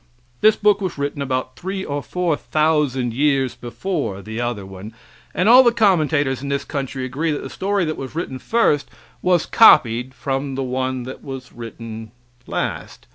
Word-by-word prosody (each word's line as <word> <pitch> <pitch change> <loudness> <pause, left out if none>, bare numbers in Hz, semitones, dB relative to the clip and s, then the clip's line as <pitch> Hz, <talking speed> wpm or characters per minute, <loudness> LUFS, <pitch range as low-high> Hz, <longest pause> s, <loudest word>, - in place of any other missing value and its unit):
This 215 0 +6
book 205 -1 +3
was 185 -5 -3
written 140 0 -3
about 130 -1 -2
three 190 +1 -4
or 145 0 -3
four 175 0 -1
thousand 150 -6 0
years 135 -1 +1
before 120 - -4
the 110 +3 -5
other 120 -5 -3
one, 95 +4 -10 0.4
and 185 - 0
all 245 +3 +9
the 240 -2 +4
commentators 155 - +2
in 140 - -5
this 140 0 -1
country 135 -2 -4
agree 145 +6 -2
that 145 - -3
the 135 - -7
story 195 -1 0
that 155 - -3
was 135 +2 -7
written 135 -6 -4
first 185 - +1 0.3
was 180 -3 +2
copied 125 - +5
from 135 0 -3
the 135 - -2
one 130 0 -2
that 130 +2 -9
was 130 -2 -8
written 115 -1 -8 0.4
last. - - -4
140 Hz, 175 wpm, -21 LUFS, 125-165 Hz, 0.4 s, all